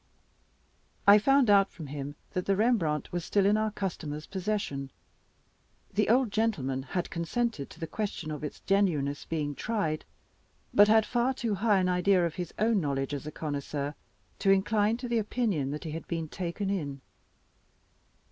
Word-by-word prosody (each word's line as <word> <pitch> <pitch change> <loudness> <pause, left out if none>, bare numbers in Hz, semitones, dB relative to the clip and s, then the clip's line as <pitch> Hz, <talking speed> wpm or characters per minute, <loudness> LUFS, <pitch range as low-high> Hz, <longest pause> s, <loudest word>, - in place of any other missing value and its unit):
I 205 +1 +9
found 270 +3 +4
out 200 -1 +5
from 160 - -9
him 145 0 -6 0.2
that 180 - -3
the 195 - +3
Rembrandt 195 -9 +1
was 175 -1 -2
still 200 +2 +2
in 205 +1 +4
our 215 0 +1
customer's 160 -7 -4
possession. 190 -8 -3 1.0
The 210 +1 +1
old 245 -1 +3
gentleman 150 -13 0
had 175 +6 -3
consented 170 - -2
to - - -14
the 165 - -3
question 175 -3 -4
of 150 -1 -5
its 150 - -6
genuineness 160 -8 +1
being 150 -3 -2
tried, 160 - -2 0.7
but 205 0 +7
had 220 0 +5
far 245 +3 +1
too 230 -4 -1
high 205 +1 +3
an 185 -1 +2
idea 180 0 +3
of 165 - -2
his 175 -2 -5
own 220 -1 +2
knowledge 140 -2 -1
as 145 +1 -4
a - - -4
connoisseur 145 -1 -3 0.5
to 195 - +1
incline 205 +3 +3
to 245 0 -5
the 235 -1 +1
opinion 210 - -1
that 150 +2 -4
he 160 - -5
had 165 +1 -6
been 165 -2 -3
taken 185 +4 -3
in. 145 -8 -3
185 Hz, 170 wpm, -29 LUFS, 150-215 Hz, 1.0 s, I